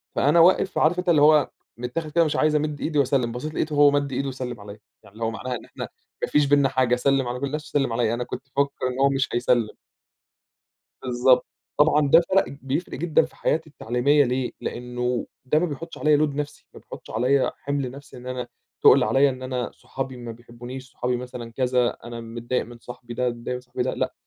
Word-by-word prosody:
فأنا 150 +5 +4
واقف 185 +2 +4
عارف 170 +3 +3
أنت 180 - -1
اللي 150 -4 +5
هو 150 0 +5 0.3
متاخد 125 +6 -4
كده 170 +2 +4
مش 155 - -1
عايز 155 0 +2
أمِدّ 150 -1 -1
إيدي 150 -2 0
وأسلّم، 130 -3 +1
بَصّيت 150 +6 -5
لقيته 155 -1 -2
هو 145 0 +6
مَدّ 140 -1 0
إيده 135 +2 -2
وسلم 125 -3 -6
عليَّ، 100 +1 -10 0.2
يعني 100 - -18
اللي 115 +1 -7
هو 115 - 0
معناها 125 +3 -4
إن - - -9
إحنا - - -7 0.3
ما - - +2
فيش 150 -1 +3
بيننا 140 -1 +4
حاجة، 130 -2 +2
سلّم 135 0 +1
على 125 +1 -3
كل 140 - -1
الناس، 150 +2 -4
وسلم 135 -5 0
عليَّ، 115 -1 +1
أنا 120 +1 -2
كنت - - -6 0.2
مفكّر 140 -2 0
إن 130 +1 -4
هو 140 0 +5
مش 135 0 0
هيسلّم. 120 -2 +2 1.3
بالضبط، 125 0 +3 0.3
طبعًا 150 0 +4
ده 165 +3 +8
فَرَق 195 +1 +4 0.2
بيفرِق 140 +6 -3
جدًا 160 +2 +3
في - - -17
حياتي 160 0 -1
التعليمية 140 +2 +2
ليه، 125 0 -1
لأنه 125 0 -3 0.2
ده 150 +4 +3
ما 180 - +1
بيحطش 165 +2 -7
عليَّ 150 -1 +3
load 150 -2 +1
نفسي، 150 0 -5
ما - - -12
بيحطّش - - -12
عليَّ 130 +4 +2
حِمل 140 -3 -3
نفسي 140 -1 -12
إن 125 +1 -10
أنا 125 -1 -4 0.3
تُقل - - +7
عليَّ 135 +6 +4
إن 130 -1 -6
أنا 125 -2 -3
صحابي 130 -1 -6
ما 120 -1 -7
بيحبونيش، 120 +2 -10
صحابي 125 0 -1
مثلًا 125 -2 -7
كذا، 125 0 +1
أنا 120 -1 -7
متضايق 120 +2 -3
من 120 0 -12
صاحبي 120 0 -10
ده، 125 0 -2
صاحبي 125 0 -4
ده 130 - -1
لأ - - -2
130 Hz, 210 wpm, -24 LUFS, 125-145 Hz, 1.3 s, ده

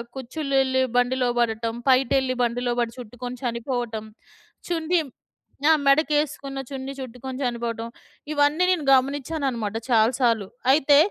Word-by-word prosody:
కుచ్చిళ్లు 275 +2 -4
ఎళ్లి 260 0 +1
బండిలో 250 +1 +2
పడటం, 225 -1 0
పైటెళ్ళి 260 0 +3
బండిలో 245 +1 0
పడి 235 -1 0
చుట్టుకొని 245 +1 -7
చనిపోవటం, 235 -2 -3 0.6
చున్‌డిమ్ 330 -3 0 0.6
ఆ! - - +8
మెడకేసుకున్న 290 -1 +1
చున్నీ 270 0 -5
చుట్టుకొని 255 +1 -7
చనిపోవటం, 235 -2 -3 0.4
ఇవన్నీ 295 +4 +3
నేను 350 -5 +1
గమనించానన్నమాట 265 -5 -1
చాలా 225 0 +4
సార్లు. 230 -5 +2 0.3
అయితే, 285 0 +5
255 Hz, 115 wpm, -24 LUFS, 235-280 Hz, 0.6 s, ఆ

